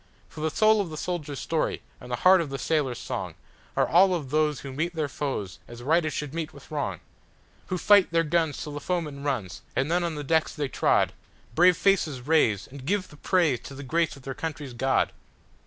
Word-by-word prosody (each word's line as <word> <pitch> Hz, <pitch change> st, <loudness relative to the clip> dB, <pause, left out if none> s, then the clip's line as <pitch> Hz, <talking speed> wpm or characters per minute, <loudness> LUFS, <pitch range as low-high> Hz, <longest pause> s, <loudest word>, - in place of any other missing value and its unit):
For -, -, -11 dB
the 160 Hz, -, +1 dB
soul 215 Hz, +5 st, +4 dB
of 190 Hz, -, -4 dB
the 155 Hz, -, -7 dB
soldier's 150 Hz, -5 st, -3 dB
story 160 Hz, -2 st, -1 dB, 0.2 s
and 125 Hz, -, -11 dB
the -, -, +1 dB
heart 185 Hz, -1 st, +8 dB
of 160 Hz, -, -4 dB
the 135 Hz, -, -4 dB
sailor's 140 Hz, -5 st, 0 dB
songAre -, -, -4 dB
all 185 Hz, +2 st, +5 dB
of 145 Hz, -6 st, -5 dB
those 150 Hz, -1 st, +1 dB
who 135 Hz, -1 st, -7 dB
meet 170 Hz, +5 st, -2 dB
their 155 Hz, -2 st, 0 dB
foes 130 Hz, -9 st, -4 dB
as 120 Hz, 0 st, -10 dB
right 155 Hz, +2 st, +2 dB
should 150 Hz, -2 st, -4 dB
meet 165 Hz, -2 st, -4 dB
with 140 Hz, -, -15 dB
wrong, 120 Hz, -, -3 dB, 0.7 s
Who 185 Hz, -, -2 dB
fight 200 Hz, +1 st, +5 dB
their 165 Hz, 0 st, +3 dB
guns 160 Hz, -2 st, 0 dB
till 150 Hz, -, -6 dB
the 145 Hz, -, -4 dB
foeman 150 Hz, -4 st, -3 dB
runs, 130 Hz, -11 st, -3 dB
and 135 Hz, +4 st, 0 dB
then, 175 Hz, +1 st, +2 dB
on 170 Hz, -2 st, -2 dB
the 150 Hz, -, -4 dB
decks 160 Hz, +2 st, +1 dB
they 145 Hz, -3 st, -2 dB
trod, -, -, +2 dB, 0.4 s
Brave 180 Hz, +5 st, +5 dB
faces 165 Hz, -9 st, +2 dB
raise, 120 Hz, -8 st, +2 dB
and 135 Hz, 0 st, -11 dB
give 190 Hz, +5 st, -1 dB
the 150 Hz, -, -15 dB
praise 160 Hz, -7 st, +2 dB
to 135 Hz, -, -10 dB
the 140 Hz, -, -8 dB
grace 165 Hz, +4 st, 0 dB
of 135 Hz, -, -15 dB
their 135 Hz, -, -4 dB
country's 150 Hz, -3 st, -5 dB
God! 130 Hz, +2 st, +1 dB
150 Hz, 215 wpm, -26 LUFS, 135-170 Hz, 0.7 s, heart